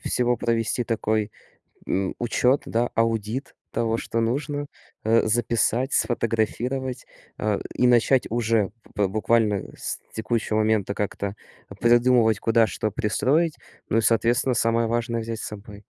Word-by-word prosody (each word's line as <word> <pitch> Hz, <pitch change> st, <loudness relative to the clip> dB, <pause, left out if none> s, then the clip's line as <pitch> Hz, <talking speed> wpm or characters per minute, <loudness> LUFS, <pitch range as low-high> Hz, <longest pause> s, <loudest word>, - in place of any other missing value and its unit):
всего 120 Hz, 0 st, +1 dB
провести 115 Hz, +1 st, 0 dB
такой, 110 Hz, -1 st, -1 dB, 0.6 s
м, 95 Hz, 0 st, -1 dB
учет, 125 Hz, +3 st, +2 dB
да, 120 Hz, +2 st, 0 dB
аудит 115 Hz, +3 st, -1 dB, 0.2 s
того, 115 Hz, -1 st, 0 dB
что 115 Hz, -, -3 dB
нужно. 145 Hz, +5 st, -1 dB, 0.4 s
Э, 115 Hz, +1 st, +3 dB
записать, 120 Hz, +3 st, +1 dB
сфотографировать, 120 Hz, +3 st, -1 dB, 0.3 s
э, 105 Hz, -1 st, 0 dB
и 125 Hz, -, +2 dB
начать 125 Hz, +2 st, +3 dB
уже 115 Hz, -3 st, +1 dB, 0.2 s
п 105 Hz, -2 st, +2 dB
буквально 105 Hz, 0 st, +1 dB
с -, -, -3 dB
текущего 110 Hz, -1 st, -1 dB
момента 110 Hz, -2 st, +1 dB
как-то 100 Hz, 0 st, -3 dB, 0.4 s
придумывать, 120 Hz, -2 st, +4 dB
куда 115 Hz, 0 st, +3 dB
что 110 Hz, +2 st, -3 dB
пристроить, 145 Hz, -, +1 dB, 0.3 s
ну 110 Hz, -, +2 dB
и, -, -, +2 dB
соответственно, 120 Hz, +3 st, +2 dB
самое 115 Hz, 0 st, +2 dB
важное 115 Hz, 0 st, -1 dB
взять 115 Hz, 0 st, -5 dB
с -, -, -4 dB
собой. 105 Hz, 0 st, -10 dB
115 Hz, 130 wpm, -24 LUFS, 110-120 Hz, 0.6 s, придумывать